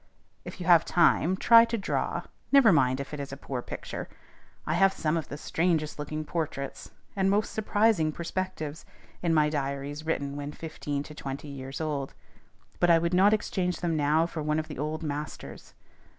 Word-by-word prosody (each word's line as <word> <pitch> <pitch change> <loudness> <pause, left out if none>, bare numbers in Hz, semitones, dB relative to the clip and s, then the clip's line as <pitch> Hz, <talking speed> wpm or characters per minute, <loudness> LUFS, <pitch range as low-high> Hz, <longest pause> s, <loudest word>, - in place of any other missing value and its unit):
If - - -9
you 180 - -5
have 170 -2 +6
time, 175 +1 +3
try 230 +3 +7
to 230 0 -2
draw: 200 - -2 0.3
never 275 -6 +7
mind 130 -3 +3
if 140 +2 -6
it 150 - -4
is 140 -1 -5
a 140 - -6
poor 130 -2 -5
picture. - - -7 0.6
I 155 - 0
have 195 +3 +4
some 155 0 -1
of 160 -3 -2
the 145 - -7
strangest 160 -1 0
looking 155 +1 -4
portraits 150 -4 -4 0.3
and 195 -1 +2
most 205 +2 +1
surprising 210 -6 +2
perspectives 170 -2 -4 0.4
in 170 - +1
my 155 -2 +4
diaries 140 0 -3
written 140 -3 -2
when 145 +1 -5
fifteen 150 -3 -4
to 150 - -11
twenty 140 0 -6
years 135 -1 -7
old; 145 -4 -3 0.6
but 175 - +3
I 170 - +7
would 170 +1 0
not 190 +3 +5
exchange 185 -4 -1
them 170 -2 0
now 155 +2 +3
for 165 -2 -5
one 150 +1 0
of 155 0 -2
the - - -7
"old 155 +2 -3
masters." 150 0 -6
155 Hz, 185 wpm, -28 LUFS, 145-180 Hz, 0.6 s, try